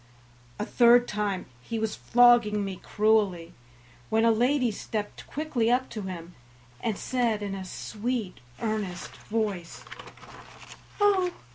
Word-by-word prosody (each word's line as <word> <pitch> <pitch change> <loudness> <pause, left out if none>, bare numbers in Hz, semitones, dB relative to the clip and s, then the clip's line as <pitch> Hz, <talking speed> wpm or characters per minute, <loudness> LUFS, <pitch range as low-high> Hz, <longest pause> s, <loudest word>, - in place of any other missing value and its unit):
A 210 - -2
third 240 +1 +5
time 205 -3 -2 0.2
he 225 - -4
was 220 -1 -2
flogging 235 -4 +4
me 190 -1 -5
cruelly, 205 -6 +1 0.6
when 225 +1 +3
a 230 - +6
lady 245 +2 +2
stepped 210 0 -5
quickly 280 -7 -1
up 255 +2 +1
to 215 - -5
him, 180 -3 -7 0.5
and 215 - -2
said 235 -5 0
in 200 -1 -3
a 195 -1 -5
sweet, 215 +1 -4 0.2
earnest 210 -5 -3
voice: 205 -6 -4 1.1
"Oh! 390 -3 +3
220 Hz, 125 wpm, -27 LUFS, 200-240 Hz, 1.1 s, a